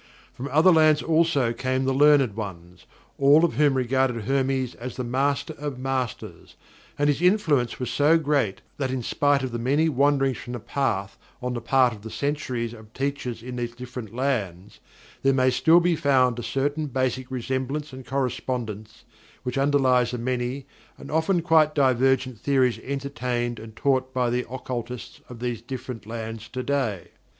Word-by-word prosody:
From 130 - -6
other 155 +6 +5
lands 155 -2 +4
also 160 -7 +2
came 130 +2 -1
the 135 - +1
learned 140 -5 +4
ones, 90 -5 -8 0.3
all 145 +4 +6
of 170 - -1
whom 145 +2 +3
regarded 130 -2 +1
Hermes 135 0 0
as 125 +1 -7
the 125 - -3
Master 140 +4 0
of 145 -3 -4
Masters, 130 -3 -4 0.4
and 145 - +2
his 145 +1 +1
influence 165 - +2
was 125 -2 -3
so 150 +5 +4
great 140 -10 0 0.2
that 135 -2 -1
in 130 -1 -3
spite 145 +2 +1
of 130 - -3
the 120 - -3
many 145 +7 +2
wanderings 135 -2 +2
from 120 - -7
the 120 - -4
path 105 -5 -2 0.2
on 125 -1 -3
the 120 - -4
part 125 +1 +3
of 105 - -11
the 110 - -8
centuries 120 -1 -2
of 110 -2 -14
teachers 135 -4 -3
in 125 0 -6
these 120 -1 -4
different 125 -3 -8
lands, 105 -7 -3 0.4
there 135 0 +3
may 130 -1 +3
still 160 +7 +5
be 175 -1 +2
found 130 -5 +2
a - - -3
certain 140 +6 -1
basic 130 -1 -2
resemblance 130 +3 -3
and 130 -1 -10
correspondence 120 -4 -3 0.4
which 125 -2 -3
underlies 135 -3 +3
the 125 - -3
many 125 +2 -2 0.3
and 140 - -10
often 160 +3 +1
quite 160 -2 +4
divergent 130 -3 +2
theories 130 -3 +2
entertained 125 -3 -3
and 110 0 -11
taught 130 0 +1
by 125 -2 +1
the 125 +1 -1
occultists 125 -1 -6
of 125 - -9
these 120 -1 -3
different 120 -2 -7
lands 115 -1 -6
today. 130 -5 -2
130 Hz, 170 wpm, -25 LUFS, 120-140 Hz, 0.4 s, all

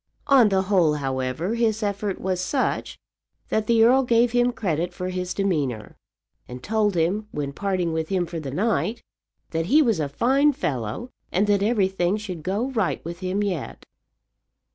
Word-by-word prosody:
On 270 -6 +6
the 190 -1 +2
whole, 180 -6 +3
however, 135 - -2
his 225 -2 0
effort 200 -1 -2
was 185 -1 -1
such 260 +9 -1 0.5
that 220 -1 0
the 230 -1 +5
earl 255 +4 +5
gave 240 -1 +3
him 245 +1 +3
credit 175 -6 -2
for 180 +1 -4
his 180 0 -3
demeanour, 145 - -2 0.5
and 125 0 -9
told 210 -2 +1
him 185 +6 0
when 145 -6 -4
parting 185 -2 -1
with 160 0 -2
him 185 -2 0
for 170 0 -6
the 145 -3 -6
night 220 - -1 0.5
that 165 0 -1
he 295 +10 +5
was 225 - +1
a 145 -2 -1
fine 270 - +3
fellow, 145 - -3 0.2
and 190 +4 +2
that 205 -1 +2
everything 195 -3 +1
should 190 -6 -6
go 205 - -2
right 220 -11 -1
with 170 +1 -6
him 190 +2 -1
yet. 180 -8 -4
190 Hz, 170 wpm, -24 LUFS, 165-220 Hz, 0.5 s, On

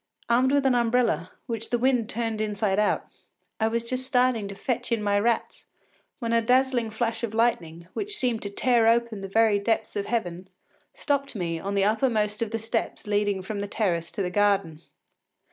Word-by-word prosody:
Armed 250 +3 +3
with 280 -1 +2
an 265 - +4
umbrella, 235 -6 +1 0.2
which 230 -2 -4
the 240 - +1
wind 245 -2 +1
turned 225 -1 -2
inside 210 -2 0
out, 210 - +1 0.5
I 220 - +2
was 230 +1 -1
just 255 +2 -3
starting 250 -4 +1
to 200 - -7
fetch 245 +3 -3
in 225 -2 0
my 205 0 +2
rats, 230 +2 -1 0.5
when 230 -2 -2
a 230 - +4
dazzling 250 -1 +2
flash 225 +1 -2
of 225 -2 -3
lightning, 170 -8 0
which 420 +1 -2
seemed 245 -4 0
to 200 - -4
tear 235 +2 +2
open 230 -2 +2
the 195 - -5
very 215 +1 +3
depths 220 +2 -1
of 200 -1 -2
heaven, 185 -6 -2 0.5
stopped 280 -3 -1
me 170 -4 -2
on 200 +3 -3
the 200 - +3
uppermost 215 -1 +1
of 230 - 0
the 225 - -2
steps 225 +1 -3
leading 205 -2 0
from 205 +1 -4
the 205 - -3
terrace 175 -6 -1
to 200 - -2
the 180 - -2
garden. 195 -5 +1
225 Hz, 195 wpm, -26 LUFS, 200-240 Hz, 0.5 s, an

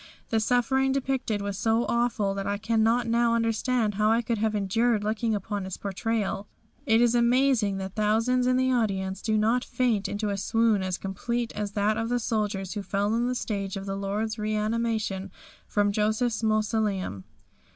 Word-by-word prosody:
The 225 - +2
suffering 255 +4 +2
depicted 260 -6 -1
was 200 0 -4
so 225 +1 +2
awful 235 -4 +1
that 195 0 -4
I 200 0 0
cannot 225 +2 +2
now 235 0 +2
understand 230 0 +1
how 210 +2 +2
I 230 +2 +3
could 230 -1 -1
have 215 0 0
endured 210 +2 +1
looking 220 +1 0
upon 205 0 -3
its 190 -1 -5
portrayal. 205 0 -2 0.4
It 225 +1 +4
is 240 -1 +4
amazing 240 -4 +3
that 190 0 -5
thousands 225 +4 +2
in 255 0 +3
the 260 0 +2
audience 195 -5 -1
did 215 -1 +1
not 230 +4 +2
faint 235 -6 0
into 205 +1 -2
a 200 - -2
swoon 225 0 +2
as 185 -1 -2
complete 235 +5 -3
as 205 -1 -3
that 210 +1 +1
of 225 0 -2
the 245 - +1
soldiers 210 -5 -2
who 210 - -3
fell 200 +2 -1
on 235 +1 +1
the 250 - -1
stage 200 -5 -3
at 195 - -6
the 195 0 -3
Lord's 210 +3 -2
reanimation 215 -2 -1 0.4
from 205 -1 +1
Joseph's 215 +2 0
mausoleum. 215 - 0
220 Hz, 180 wpm, -27 LUFS, 200-235 Hz, 0.4 s, It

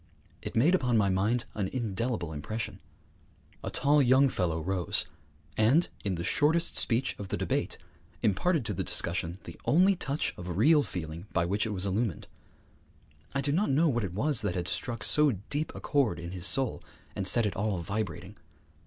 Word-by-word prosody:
It - - -7
made 140 +11 +4
upon 125 -10 +2
my 100 -2 +3
mind 105 +6 +1
an 100 -3 -2
indelible 115 -6 -3
impression. 110 +10 -5 0.8
A - - -3
tall 145 +1 +3
young 130 +1 +5
fellow 85 -7 -1
rose, 90 +1 -1 0.5
and, 125 +11 +4
in 100 -3 -1
the 85 - -4
shortest 160 - +2
speech 120 +2 +2
of 100 - -5
the - - -3
debate, - - -2 0.5
imparted 135 - +1
to 105 - -2
the - - -2
discussion 85 0 -2
the - - -10
only 185 +5 +4
touch 150 -4 -1
of 90 -1 -5
real 150 +8 +5
feeling 85 - -6
by 85 -1 +1
which 100 +5 0
it - - -3
was 95 -1 -2
illumined. 100 -1 -1 1.1
I 140 - +1
do 140 +1 0
not 185 +8 +1
know 155 +4 +3
what 120 -4 0
it 90 -3 -4
was 140 +3 +1
that 100 -4 -2
had 90 -1 -2
struck 115 -1 -3
so 150 -3 +4 0.2
deep 150 +2 -1
a - - -6
chord 135 - +1
in 85 0 -7
his 90 0 0
soul 130 +6 0 0.3
and 95 - -1
set 115 +3 +6
it 105 - -2
all 100 -1 -1
vibrating. 95 +1 -4
110 Hz, 185 wpm, -29 LUFS, 95-135 Hz, 1.1 s, set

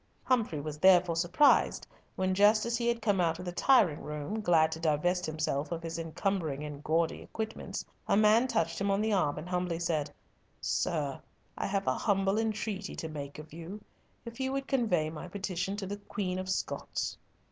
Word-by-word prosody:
Humfrey 225 - +1
was 150 +1 -6
therefore 180 -1 +5
surprised 175 - +3 0.3
when, 185 0 0
just 210 +3 +5
as 235 0 0
he 235 0 -1
had 235 -1 0
come 200 -4 +2
out 165 -1 +1
of 180 - -8
the 175 - -3
tiring 180 - +4
room, 150 +9 -4
glad 160 -5 +4
to 160 - -4
divest 165 +3 +1
himself 155 -1 -2
of 165 -1 -3
his 165 0 -4
encumbering 165 -3 -2
and 150 -1 -7
gaudy 165 +1 +1
equipments, 220 0 -5 0.2
a - - +3
man 215 +4 +5
touched 165 -6 -1
him 200 - +1
on 195 0 +2
the 215 0 +1
arm 150 -7 +1
and 155 +3 -6
humbly 180 -2 -1
said, 165 -4 -1 0.5
"Sir, 150 -6 -1 0.3
I - - -2
have 195 0 -1
a 130 - +2
humble 195 - +1
entreaty 215 -2 -2
to 160 - -5
make 145 -2 -7
of 155 0 -11
you. 170 +5 -7 0.5
If 235 +1 -9
you 265 0 -1
would 275 0 -2
convey 180 - +1
my 160 +2 -7
petition 190 0 -3
to 200 - -4
the 200 +2 -4
Queen 190 -2 -3
of 185 0 -5
Scots!" 190 - -2
180 Hz, 190 wpm, -31 LUFS, 160-205 Hz, 0.5 s, therefore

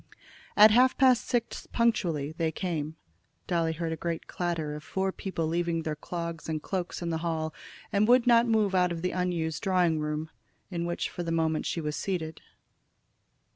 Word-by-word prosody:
At 210 +1 +9
half 250 +3 +5
past 255 -3 +4
six 240 -2 -2
punctually 175 -11 +1
they 160 0 -1
came. 160 -3 -3 0.5
Dolly 165 -2 +1
heard 165 0 -3
a - - -2
great 165 0 -3
clatter 165 -4 -2
of 150 0 -7
four 190 +2 -1
people 185 -4 -3
leaving 165 0 0
their 155 -1 -2
clogs 170 +1 -5
and 155 -1 -1
cloaks 180 +1 -4
in 170 - -2
the 160 - -1
hall, 160 -1 -2 0.4
and 210 0 +3
would 250 0 +5
not 235 -1 +5
move 215 -4 +2
out 180 -1 +3
of 170 0 -4
the 180 - 0
unused 170 -4 -1
drawing 180 -4 +2
room, 150 +1 -3 0.4
in 170 -1 -2
which 175 - -1
for - - -6
the 170 -1 -3
moment 160 -1 0
she 165 - -2
was 150 -1 -2
seated. 160 -4 -3
170 Hz, 180 wpm, -28 LUFS, 160-190 Hz, 0.5 s, At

